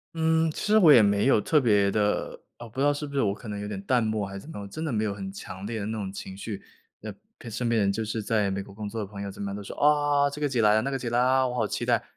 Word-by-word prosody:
嗯， 160 0 +2
其 - - -11
实 215 +1 +4
我 170 -7 +7
也 120 -6 +8
没 100 +3 +2
有 135 - +5
特 150 +7 +2
别 105 -5 +3
的 105 0 -1 0.2
呃， 120 - -9
不 115 +4 -9
知 - - +2
道 145 - +5
是 145 +1 -4
不 140 - -9
是 140 - +1
我 100 -5 +2
可 110 +3 -9
能 105 -1 -4
有 105 - -5
点 105 -2 -5
淡 125 +2 +2
漠 110 -2 -1
还 100 - -8
是 100 - -6
怎 155 - -13
么 - - -9
样， 100 - -6
我 - - -8
真 155 +11 -6
的 155 - -2
没 110 -2 0
有 105 -2 -1
很 95 -1 -6
强 95 0 -8
烈 115 0 -3
的 100 - -3
那 110 - -3
种 95 -2 -4
情 95 -1 -8
绪， 100 +1 -6 0.4
呃 - - -6 0.2
陪 - - -12
身 115 +2 -2
边 115 - +2
的 105 - +3
人。 100 - +1
就 110 - -2
是 110 0 -3
在 105 -2 +1
美 95 0 -3
国 100 - -14
工 105 0 -6
作 115 +1 -5
的 105 - -2
朋 100 0 -9
友 100 - -4
怎 95 - -11
么 100 -1 -3
样 100 - -5
都 105 - -6
说： 100 - -8
“啊！ 145 -1 +3
这 150 - -8
个 145 - +1
节 120 -4 +1
来 105 0 +5
了， 110 - +3
那 135 - -2
个 135 - -2
节 125 -3 -4
来 120 - +2
了。 - - +4
啊！ 130 0 +3
我 125 - -4
好 125 - 0
期 120 - -3
待。” 120 -1 +2
110 Hz, 390 characters per minute, -26 LUFS, 100-135 Hz, 0.4 s, 也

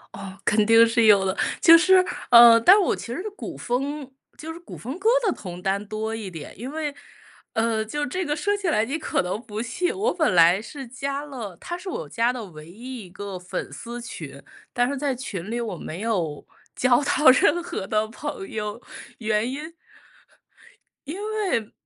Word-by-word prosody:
哦， 195 -1 -9
肯 210 0 +3
定 225 +1 +7
是 230 0 +2
有 200 -2 +6
的。 190 0 -1 0.2
就 330 0 +9
是， 370 +2 +5 0.3
呃， 235 -1 +9
但 385 - +7
我 380 - +1
其 - - -9
实 240 +9 -4
古 - - -7
风 275 +3 -3 0.3
就 320 +1 -7
是 335 - -10
古 - - -10
风 260 +8 -6
歌 410 +4 +2 0.2
的 375 - +2
同 180 -2 -9
担 200 +2 -1
多 220 +1 -3
一 210 -4 -6
点。 160 -3 -9
因 245 +6 -6
为， 300 -2 -4 0.6
呃， 225 -1 +1
就 290 +7 -3
这 370 +7 -3
个 295 - -1
说 410 +4 0
起 400 -3 -2
来 225 -8 +2
你 280 +6 -3
可 320 - -1
能 185 +3 -3
不 215 -1 -5
信， 290 +10 -2
我 425 +5 0
本 315 - +1
来 175 +3 +5
是 270 +3 -9
加 275 +3 -4
了 230 -11 -8
它 350 - -5
是 370 +2 -8
我 475 +6 -5
加 235 +1 +1
的 245 -3 -6
唯 155 -5 -12
一 235 +1 -8
1 - - -17
个 200 0 -7
粉 180 0 -5
丝 240 +1 -7
群。 235 - -9 0.3
但 245 -1 +1
是 280 - -2
在 280 0 -1
群 215 -6 -6
里 240 - -2
我 225 -5 -3
没 165 +1 -7
有 180 -10 -2 0.3
交 255 +2 +3
到 290 0 +4
任 325 +6 +3
何 265 - -5
的 215 +1 0
朋 230 -3 -7
友， 210 +2 -4 0.4
原 220 +1 0
因 310 +5 -7 1.3
因 305 - -4 0.4
为 220 -2 -1
235 Hz, 210 characters per minute, -24 LUFS, 210-295 Hz, 1.3 s, 就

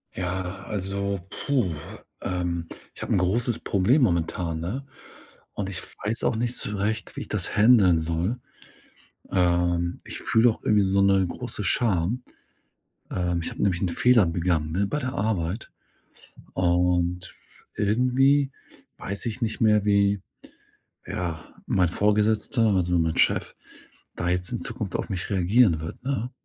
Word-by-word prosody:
Ja, 95 +1 -3
also, 100 -1 -2
puh. 125 - 0 0.5
Ähm, 85 -2 -2 0.3
ich - - -11
habe - - -1
'n - - +3
großes 115 +6 +1
Problem 105 +10 +2
momentan, 85 -5 0
ne? 110 +12 -4 0.7
Und 100 -2 -3
ich 95 - -5 0.2
weiß 110 +3 -2
auch - - +2
nicht 120 +2 -1
so 105 - -2
recht, 105 +2 -2
wie - - -5
ich - - -7
das - - -2
händeln 105 -6 +6
soll. 85 +8 -1 0.9
Ähm, 85 -1 +1
ich - - -7
fühle 115 +2 +4
auch 110 - -4
irgendwie 105 -1 +3
so 95 +1 +2
'ne 95 -1 +4
große 115 +3 -5
Scham. 100 +3 +1 0.9
Ähm, 90 -1 -1
ich - - -4
habe - - -6
nämlich 95 -2 +1
'n 95 - +1
Fehler 115 +4 +4
begangen, 85 -2 0
ne, 100 +4 +1
bei 105 - -2
der 130 -3 -3
Arbeit. 100 -3 -2 0.8
Und 90 0 +1 0.4
irgendwie 130 +6 +3 0.5
weiß 100 +1 -5
ich 115 +3 -5
nicht 115 +2 -2
mehr, 105 -2 +4
wie, 100 -1 +3 0.8
ja, 85 -3 -5
mein 90 -3 +2
Vorgesetzter, 105 +4 +2
also, 90 -2 +2
mein 80 -1 0
Chef - - +2 0.6
da 85 - -2
jetzt 90 0 0
in - - -3
Zukunft - - -4
auf - - -2
mich 95 +1 -3
reagieren 95 -1 +3
wird, 80 - -7
ne? 130 -2 -2
100 Hz, 145 wpm, -25 LUFS, 90-110 Hz, 0.9 s, händeln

